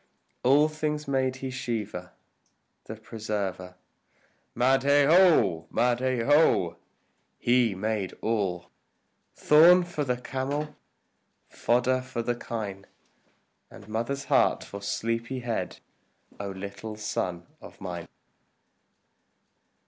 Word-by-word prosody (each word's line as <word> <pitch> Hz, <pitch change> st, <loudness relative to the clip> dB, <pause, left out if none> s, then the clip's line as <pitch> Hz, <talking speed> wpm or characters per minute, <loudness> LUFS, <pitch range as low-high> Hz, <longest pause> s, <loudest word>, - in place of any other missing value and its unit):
All 140 Hz, +4 st, +5 dB
things 155 Hz, -1 st, -3 dB
made 130 Hz, -1 st, 0 dB
he 130 Hz, -, -3 dB
Shiva 110 Hz, -8 st, -4 dB, 0.7 s
the 110 Hz, -, -7 dB
Preserver. 105 Hz, -5 st, -5 dB, 0.8 s
Mahadeo! 140 Hz, -, +4 dB
Mahadeo! 130 Hz, +4 st, +2 dB, 0.6 s
He 120 Hz, -4 st, +2 dB
made 105 Hz, -1 st, -2 dB
all, 100 Hz, -6 st, -2 dB, 0.6 s
Thorn 170 Hz, +4 st, +6 dB
for 175 Hz, -4 st, -3 dB
the 125 Hz, -3 st, -1 dB
camel, 140 Hz, +4 st, -4 dB, 0.7 s
fodder 125 Hz, +2 st, +1 dB
for 125 Hz, -2 st, -5 dB
the 120 Hz, -, 0 dB
kine, 105 Hz, -5 st, -6 dB, 0.8 s
And -, -, -14 dB
mother's 115 Hz, +6 st, -3 dB
heart -, -, +2 dB
for 100 Hz, -, -9 dB
sleepy 115 Hz, +5 st, -2 dB
head, 120 Hz, -2 st, -3 dB, 0.6 s
O 100 Hz, -1 st, -4 dB
little 100 Hz, +3 st, -7 dB
son 90 Hz, -5 st, -3 dB, 0.2 s
of -, -, -13 dB
mine! 85 Hz, -3 st, -6 dB
120 Hz, 95 wpm, -27 LUFS, 100-135 Hz, 0.8 s, Thorn